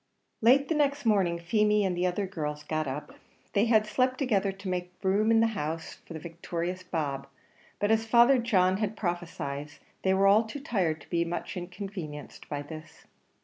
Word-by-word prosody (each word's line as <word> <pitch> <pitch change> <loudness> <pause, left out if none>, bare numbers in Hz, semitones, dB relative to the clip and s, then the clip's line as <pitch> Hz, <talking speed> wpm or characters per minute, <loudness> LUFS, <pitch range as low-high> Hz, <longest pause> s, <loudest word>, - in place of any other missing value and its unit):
Late 265 +5 +5
the - - +1
next 285 -2 +1
morning, 195 -6 +3
Feemy 210 +4 +2
and 185 -2 0
the 180 +1 +1
other 190 +3 -1
girls 150 -5 -4
got 155 -1 -2
up; 135 +3 -5 0.4
they 205 +2 +3
had 220 -2 +4
slept 255 +4 +1
together 210 -8 +1
to 195 0 -9
make 180 -1 -3
room 200 +3 +2
in 225 0 +5
the - - +5
house 165 -3 -4
for - - -8
the 160 - -6
victorious 170 +2 -4
Bob, 150 -7 -3 0.5
but 205 +1 +1
as 225 0 +2
Father 240 +3 +6
John 190 -6 +3
had 215 0 -2
prophesied, 155 -5 -4 0.3
they 190 0 +2
were 195 +1 +3
all 205 +3 +6
too 220 +6 -6
tired 180 - -1
to - - -17
be 170 -1 +2
much 170 +1 -4
inconvenienced 180 -4 -7
by 145 -1 -3
this. 155 +1 -11
190 Hz, 190 wpm, -29 LUFS, 170-215 Hz, 0.5 s, Father